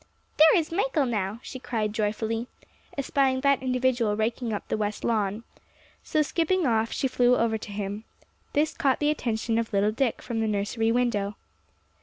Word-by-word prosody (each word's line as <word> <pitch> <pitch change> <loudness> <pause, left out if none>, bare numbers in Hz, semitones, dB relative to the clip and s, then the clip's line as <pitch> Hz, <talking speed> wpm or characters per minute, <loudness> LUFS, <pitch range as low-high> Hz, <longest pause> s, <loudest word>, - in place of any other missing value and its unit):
"There 315 +2 +8
is 325 -2 -1
Michael 340 - +1
now," 210 -3 -2
she 260 - -7
cried 215 -4 -2
joyfully, 220 +2 -1 0.5
espying 270 -1 +1
that 280 -1 +3
individual 250 -4 +1
raking 230 +2 -1
up 205 - -4
the - - -1
west 210 -1 -3
lawn. 215 -1 0 0.6
So 310 - +1
skipping 340 +3 +1
off, 225 -2 +1
she 270 - 0
flew 250 -1 +3
over 225 -1 +1
to 210 - -8
him. 205 +1 -4 0.5
This 300 +2 +2
caught 270 -2 +1
the 295 0 +2
attention 230 -5 -1
of 230 - -3
little 205 +1 +2
Dick 240 +2 -1
from 235 -2 -3
the 220 - +1
nursery 215 +2 0
window. 215 -4 0
230 Hz, 170 wpm, -26 LUFS, 215-265 Hz, 0.6 s, There